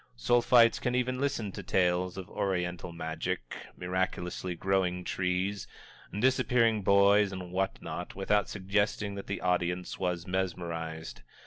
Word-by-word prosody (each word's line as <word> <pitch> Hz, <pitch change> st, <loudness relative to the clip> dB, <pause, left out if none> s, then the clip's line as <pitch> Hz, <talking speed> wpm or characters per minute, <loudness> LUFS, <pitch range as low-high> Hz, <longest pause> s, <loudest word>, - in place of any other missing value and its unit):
Sulphites 120 Hz, -, +4 dB
can 125 Hz, 0 st, 0 dB
even 125 Hz, +1 st, 0 dB
listen 120 Hz, -8 st, -1 dB
to -, -, -7 dB
tales 90 Hz, 0 st, +1 dB
of 95 Hz, -2 st, -6 dB
Oriental 90 Hz, -2 st, -2 dB
magic, 80 Hz, -7 st, -4 dB, 0.2 s
miraculously 90 Hz, 0 st, -2 dB
growing 90 Hz, -1 st, 0 dB
trees, 90 Hz, +3 st, -1 dB, 0.5 s
disappearing 125 Hz, -3 st, +3 dB
boys 100 Hz, +1 st, +5 dB
and 90 Hz, -2 st, -6 dB
what 95 Hz, +1 st, -1 dB
not, -, -, -6 dB
without 100 Hz, +1 st, +1 dB
suggesting 100 Hz, +1 st, 0 dB
that 100 Hz, 0 st, -7 dB
the 100 Hz, -, -3 dB
audience 90 Hz, 0 st, -1 dB
was 90 Hz, -2 st, -1 dB
mesmerized. 80 Hz, -7 st, -3 dB
95 Hz, 125 wpm, -30 LUFS, 90-100 Hz, 0.5 s, boys